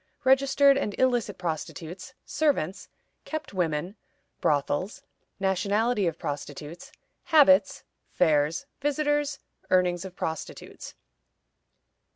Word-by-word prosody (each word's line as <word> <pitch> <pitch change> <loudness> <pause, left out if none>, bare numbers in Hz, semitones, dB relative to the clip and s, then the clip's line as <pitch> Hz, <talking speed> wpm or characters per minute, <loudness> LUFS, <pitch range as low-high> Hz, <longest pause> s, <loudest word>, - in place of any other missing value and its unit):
Registered 275 +1 +4
and 205 -7 -3
illicit 245 -5 +1
Prostitutes. 175 +6 -5
Servants. 275 - -1 0.3
Kept 310 -8 -6
women. 175 +1 -2 0.4
Brothels. 155 - 0 0.4
Nationality 200 +2 +1
of 165 -1 -2
Prostitutes. 150 - -7 0.3
Habits. 290 -4 +5 0.3
Fairs. 155 - +1 0.2
Visitors. 295 0 0 0.3
Earnings 180 -1 +2
of 190 -1 -9
Prostitutes. 160 -3 -6
200 Hz, 85 wpm, -27 LUFS, 165-275 Hz, 0.4 s, Habits